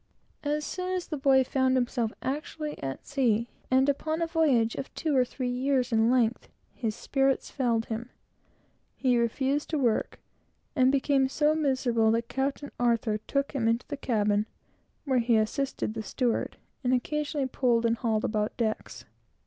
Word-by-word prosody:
As 295 +1 -1
soon 365 0 -3
as 360 - -2
the 310 - -4
boy 270 -2 +4
found 260 0 +1
himself 240 -2 0
actually 300 +2 -3
at 135 -1 -5
sea, 240 -5 +1 0.2
and 260 +1 +4
upon 310 +3 0
a 335 - +1
voyage 290 -9 +2
of 270 - -6
two 310 -3 0
or 255 - +5
three 250 0 -3
years 255 0 0
in 225 0 +3
length, 245 -2 +1 0.2
his 225 -4 -3
spirits 270 -1 0
failed 235 -4 0
him; 230 +2 -5 0.9
he 250 -3 +2
refused 265 +5 0
to 315 - 0
work, 240 -6 0 0.6
and 260 -1 +4
became 275 -1 +2
so 300 +2 +2
miserable, 260 -7 +2
that 230 +1 0
Captain 275 +2 -2
Arthur 230 -3 +1
took 275 +6 -1
him 255 -6 0
into 230 +2 +1
the - - -2
cabin, 210 -5 +1 0.6
where 260 -3 +2
he 230 -1 +3
assisted 220 +2 -1
the 220 - -4
steward, 240 +2 -1 0.3
and 255 0 +3
occasionally 295 +2 -1
pulled 245 -3 +1
and 230 0 +2
hauled 220 -2 0
about 215 0 -1
decks. 220 -2 -3
255 Hz, 165 wpm, -28 LUFS, 230-280 Hz, 0.9 s, or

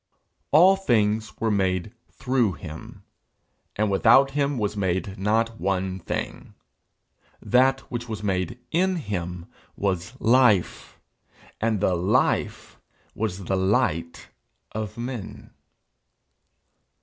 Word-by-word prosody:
'All 180 +6 +6
things 110 - 0
were 115 -1 0
made 95 -3 0 0.2
through 125 -6 0
him, 75 +2 -10 0.7
and 105 -1 0
without 120 +7 +5
him 140 -1 0
was 105 -2 -1
made 95 0 -1
not 110 +3 0
one 95 0 -1
thing. 85 - -5 0.8
That 130 +2 +3
which 120 -1 -7
was 105 -1 -5
made 95 +1 -1
in 185 +3 +2
him 90 - -4 0.3
was 100 +6 -2
life, 115 -6 +2 0.6
and 110 -3 0
the 95 - +2
life 90 +4 0 0.3
was 100 -3 -3
the 95 +2 -1
light 85 -4 0 0.4
of 110 -1 -5
men.' 120 -3 -7
105 Hz, 105 wpm, -24 LUFS, 95-120 Hz, 0.8 s, All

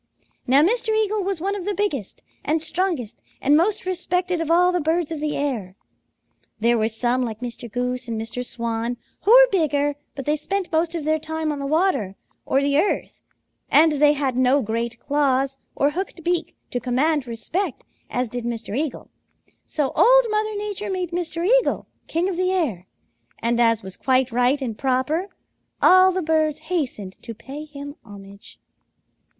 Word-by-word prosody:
Now 270 +4 +5
Mr. 445 +5 +1
Eagle 430 -1 +1
was 385 -2 -2
one 395 +4 -1
of 380 -3 -5
the 410 -1 -1
biggest 295 - -2 0.2
and 310 +2 0
strongest 335 - -2 0.2
and 285 +2 +3
most 380 +6 +2
respected 360 -1 -1
of 325 - -3
all 355 +2 +5
the 360 -1 0
birds 325 +1 0
of 320 - -3
the 300 0 -2
air. 230 -10 -3 0.8
There 235 +2 +3
were 215 - +2
some, 240 +3 0
like 225 -3 -3
Mr. 240 -2 -6
Goose 250 +1 -2
and 225 -1 -3
Mr. 225 +3 -4
Swan, 235 0 -3 0.3
who 415 - +4
were - - +9
bigger, 290 -6 +1 0.2
but 275 -2 -6
they 300 - +2
spent 370 +4 -3
most 330 +1 +1
of 330 - -3
their 310 +1 +1
time 320 0 -3
on 290 - -4
the 280 - -3
water 310 - +1 0.3
or 270 +1 +2
the 280 +1 +2
earth, 405 - -1 0.5
and 320 +1 +6
they 295 0 +4
had 275 -3 -1
no 255 +2 +3
great 230 +2 -3
claws 270 -1 0 0.2
or 285 +1 +2
hooked 350 0 -5
beak 340 -1 -1 0.2
to 245 - -1
command 270 +3 +1
respect 255 - -3 0.3
as 250 0 -1
did 245 +1 -5
Mr. 230 -3 -4
Eagle. 290 -1 -3 0.5
So 290 -4 -1
Old - - +6
Mother 430 0 0
Nature 415 0 -4
made 365 -2 -2
Mr. 340 -1 -2
Eagle - - +3 0.2
king 335 +3 0
of 375 -3 -3
the 370 0 +1
air, 245 - -1 0.5
and 235 +1 0
as 230 -2 +4
was 190 -1 -7
quite 260 -1 +2
right 250 +4 +2
and 230 -4 -3
proper, 270 - 0 0.5
all 370 +1 +7
the 370 0 -2
birds 310 -1 +1
hastened 280 - -4
to 230 - -8
pay 280 +7 -8
him 285 -1 -9
homage. 200 -2 -13
295 Hz, 180 wpm, -23 LUFS, 245-355 Hz, 0.8 s, were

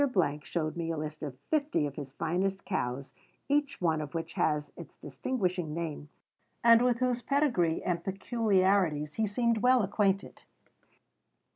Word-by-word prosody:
showed 155 0 -3
me 170 -1 -3
a 165 - -2
list 155 0 -5
of 140 -4 -5
fifty 290 - +1
of 145 - -4
his 140 -3 -7
finest 185 +5 -1
cows, 135 -8 -3 0.3
each 285 0 +1
one 160 -3 +1
of 150 +1 -7
which 165 - -4
has 150 -1 0
its 170 - -11
distinguishing 180 - -2
name, 155 -3 -4 0.5
and 230 0 +7
with 245 -1 +3
whose 250 -1 0
pedigree 240 - +1
and 170 -2 -1
peculiarities 190 -7 +1
he 220 -1 0
seemed 230 +2 +1
well 250 0 +4
acquainted. 195 0 0
185 Hz, 145 wpm, -30 LUFS, 155-230 Hz, 0.5 s, and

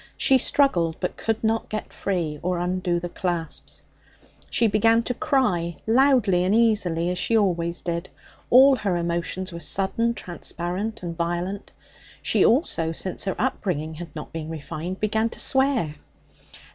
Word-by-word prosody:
She 265 -2 +4
struggled, 175 - +2
but 180 - -3
could 225 0 -2
not 225 0 0
get 215 - -5
free 170 -6 -2
or 180 0 -1
undo 180 0 -1
the 175 - -4
clasps. 170 -3 -4 0.7
She 235 - +2
began 225 +2 +3
to 250 - -2
cry, 240 - 0
loudly 230 -7 +4
and 190 +3 +2
easily, 190 -7 +2
as 180 - -3
she 230 - +2
always 170 -4 0
did. 170 +1 -3 0.4
All 265 +2 +7
her 195 -6 -1
emotions 170 +2 -2
were 170 - -6
sudden, 200 +7 +1
transparent 180 +4 -4
and 170 -1 -4
violent. 175 +4 -3 0.5
She - - +3
also, 225 - +2
since 185 +4 -4
her 190 - -1
upbringing 175 - -2
had 165 -1 -9
not 150 - -8
been 160 -1 -5
refined, 165 +3 -5
began 220 +1 +1
to - - -7
swear. 265 - +2
185 Hz, 150 wpm, -24 LUFS, 170-225 Hz, 0.7 s, All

